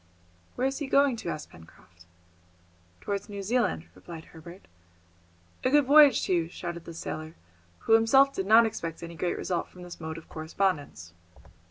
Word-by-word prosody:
"Where 255 - -1
is 270 +2 -1
he 290 - -4
going 275 -1 +3
to?" 195 - -5
asked 155 -2 -6
Pencroft. 85 +1 -18 0.9
"Towards 200 0 -4
New 200 -1 -6
Zealand," 205 - 0
replied 165 - -11
Herbert. 170 +3 -13 1.0
"A 255 - +2
good 290 +1 +4
voyage 290 +1 +6
to - - 0
you," 165 -2 0
shouted 170 -1 -7
the 170 - -8
sailor, 155 0 -6 0.5
who 225 - +2
himself 270 +5 +5
did 190 -5 -3
not 225 +2 +7
expect 170 -7 -5
any 170 0 -7
great 175 +2 -2
result 175 -2 -2
from 180 - -13
this 175 -1 -10
mode 160 0 -5
of 165 - -12
correspondence. 155 - -3
180 Hz, 170 wpm, -28 LUFS, 160-230 Hz, 1.0 s, not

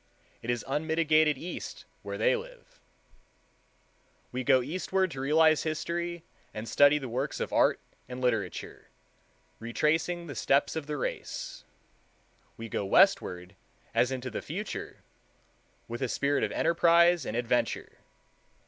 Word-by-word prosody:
It 115 - -7
is 120 -1 -1
unmitigated 155 +1 +2
East 175 +6 -7 0.2
where - - -5
they - - +3
live. - - -10 1.5
We 130 +1 -3
go 130 -1 +4
eastward 185 +5 -1
to 135 - -6
realize 155 +2 +4
history 170 +2 -3 0.3
and 110 +1 -5
study 145 +3 +5
the 135 -3 -5
works 130 +5 -3
of - - -3
art - - +3 0.3
and 125 0 -6
literature, 115 -8 -2 0.7
retracing 160 +9 0
the 145 - -7
steps 140 +3 +1
of 155 -3 -4
the 150 -1 -3
race; - - -5 0.9
we 115 - -6
go 105 - -2
westward 90 -2 +3 0.4
as 125 - +2
into 130 -1 -4
the - - -4
future, 195 +7 -6 0.8
with 120 +2 -6
a 130 - 0
spirit 140 +3 +1
of - - 0
enterprise 170 0 +4
and 115 - -3
adventure. 120 0 -1
150 Hz, 130 wpm, -29 LUFS, 125-170 Hz, 1.5 s, study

